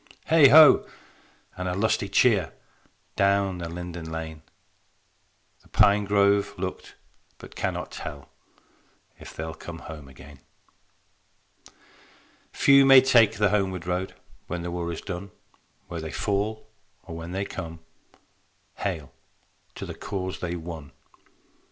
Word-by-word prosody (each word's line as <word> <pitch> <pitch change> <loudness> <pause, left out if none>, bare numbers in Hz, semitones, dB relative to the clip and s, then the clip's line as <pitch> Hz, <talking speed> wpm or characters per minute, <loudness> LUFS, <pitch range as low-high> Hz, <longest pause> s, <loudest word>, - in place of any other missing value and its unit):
Heigh 160 -3 +7
ho! 150 +2 +8 0.7
And 90 0 -3
a 90 - -2
lusty 100 -1 0
cheer, 100 - +3 0.6
Down 100 -2 +1
the 85 -1 -5
linden 85 -1 -7
lane: 80 -1 -6 1.2
The - - -23
pine 100 0 +3
grove 100 0 +2
looked 90 0 -6 0.4
but - - -13
cannot - - -3
tell 70 -2 -8 0.9
If - - -12
they'll 80 0 -5
come 85 +1 -9
home 80 -3 -10
again. 70 +2 -14 2.1
Few 140 0 +5
may 135 -1 +8
take 115 -5 +5
the 105 -1 +3
homeward 95 -4 -1
road 90 +1 -3 0.3
When 85 0 -4
the 85 - -4
war 85 -1 -3
is 80 - -6
done: 100 0 -6 0.6
Where 85 -2 -6
they 80 - -6
fall 105 +5 -2 0.4
or 85 -3 -9
when 85 +1 -7
they 95 +2 -2
come, 80 -3 -7 1.0
Hail, 80 -9 -4 0.6
to - - -6
the - - -7
cause 95 -2 -5
they 85 -1 -3
won. 80 -4 -8
90 Hz, 125 wpm, -25 LUFS, 80-100 Hz, 2.1 s, ho